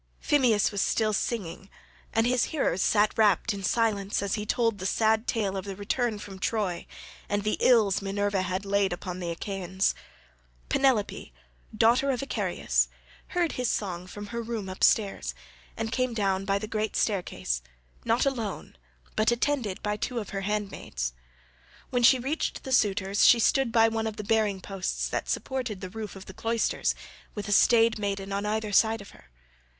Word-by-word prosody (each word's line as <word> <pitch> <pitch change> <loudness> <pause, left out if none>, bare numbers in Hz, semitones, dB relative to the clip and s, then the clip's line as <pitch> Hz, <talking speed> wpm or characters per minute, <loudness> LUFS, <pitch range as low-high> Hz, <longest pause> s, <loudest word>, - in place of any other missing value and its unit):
Phemius 250 -8 +3
was 200 -1 -1
still 215 -1 +1
singing, 195 -3 -3 0.4
and 225 0 +2
his 250 0 +2
hearers 275 - 0
sat 210 0 +3
rapt 215 +1 +3
in 200 - -6
silence 205 -1 0
as 200 - -1
he 210 -1 -2
told 230 -3 +1
the 185 - -2
sad 220 +2 +2
tale 205 -4 0
of 190 - -3
the 195 -1 -5
return 220 +3 -1
from 195 -2 -9
Troy, 200 -4 -1 0.4
and 205 0 0
the 215 - +1
ills 215 -7 +4
Minerva 200 0 0
had 185 +1 -2
laid 200 -2 +1
upon 180 +1 -6
the 175 -2 -3
Achaeans. 190 +1 -1 0.8
Penelope, 255 - +1 0.5
daughter 240 +5 +4
of 255 -3 0
Icarius, 275 - 0 0.4
heard 350 -3 0
his 250 -2 -1
song 180 -3 -3
from 205 +3 -8
her 235 - -2
room 225 -4 -4
upstairs, 195 +2 +1 0.4
and 225 0 -3
came 255 -2 0
down 195 -2 0
by 195 0 +1
the 205 - -4
great 215 0 -2
staircase, 175 - -1 0.4
not 230 +4 +2
alone, 230 - -3 0.4
but 215 - +3
attended 240 -4 0
by 210 0 -1
two 245 +3 -3
of 210 -4 -4
her 195 - -3
handmaids. 195 - -3 0.8
When 245 -1 +1
she 260 +2 +7
reached 270 +6 -2
the 265 - -6
suitors 200 -4 +2
she 240 - +8
stood 235 +2 +2
by 225 -1 +5
one 225 0 -1
of 220 - -4
the 210 - -4
bearing 210 -3 +1
posts 195 -1 -3
that - - -3
supported 250 -7 -2
the 185 -1 -7
roof 220 -1 -6
of 190 - -10
the 190 - -10
cloisters8 230 +2 0 0.4
with 205 -1 -5
a - - -3
staid 230 +2 +5
maiden 200 -1 -3
on 200 +1 -1
either 215 0 -1
side 220 +2 +3
of 200 - -12
her. - - -19
210 Hz, 175 wpm, -27 LUFS, 195-230 Hz, 0.8 s, she